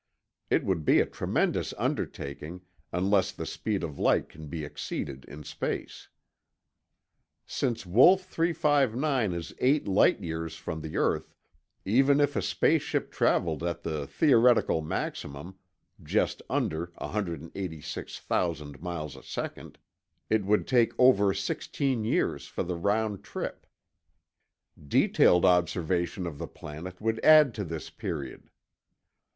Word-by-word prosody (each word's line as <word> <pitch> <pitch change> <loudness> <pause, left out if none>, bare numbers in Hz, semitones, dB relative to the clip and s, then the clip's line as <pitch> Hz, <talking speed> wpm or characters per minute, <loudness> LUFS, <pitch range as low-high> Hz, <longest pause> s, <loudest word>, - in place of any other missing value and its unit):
It - - +2
would 90 -5 0
be - - +5
a - - +3
tremendous - - -1
undertaking, 75 +6 -4 0.3
unless 95 +2 +2
the - - -6
speed 105 -3 -3
of 75 -4 -5
light - - +2
can 80 0 -11
be 80 +1 -5
exceeded 70 -2 -5
in 75 +1 -10
space. 75 - -5 1.4
Since 120 -4 -2
Wolf 165 - +6
359 145 - +1
is 85 -1 -5
eight 140 +3 +2
light 100 +2 +4
years 80 -3 -4
from 80 0 -5
the 75 0 -5
earth, - - 0 0.5
even 135 +7 +4
if 145 -1 +2
a - - +1
space - - +2
ship - - -2
traveled 80 -3 +1
at 85 0 -3
the 75 -4 -3
theoretical 120 - +4
maximum—just 90 +4 -4
under 80 +2 -1
186,00 80 -4 -4
miles 85 -5 -5
a - - -12
second—it 110 -2 -5
would 105 +2 +2
take 120 -3 +3
over 115 -6 +5
sixteen 130 +4 -2
years 110 - 0
for - - -3
the 90 0 -3
round 100 +3 0
trip. - - -6 1.2
Detailed 90 +4 +4
observation 90 +1 +1
of 80 -4 -6
the - - -4
planet 90 +5 -9
would 110 +1 -1
add 155 -5 +7
to 105 - -4
this 80 -3 -6
period. 85 - -6
90 Hz, 125 wpm, -28 LUFS, 80-115 Hz, 1.4 s, add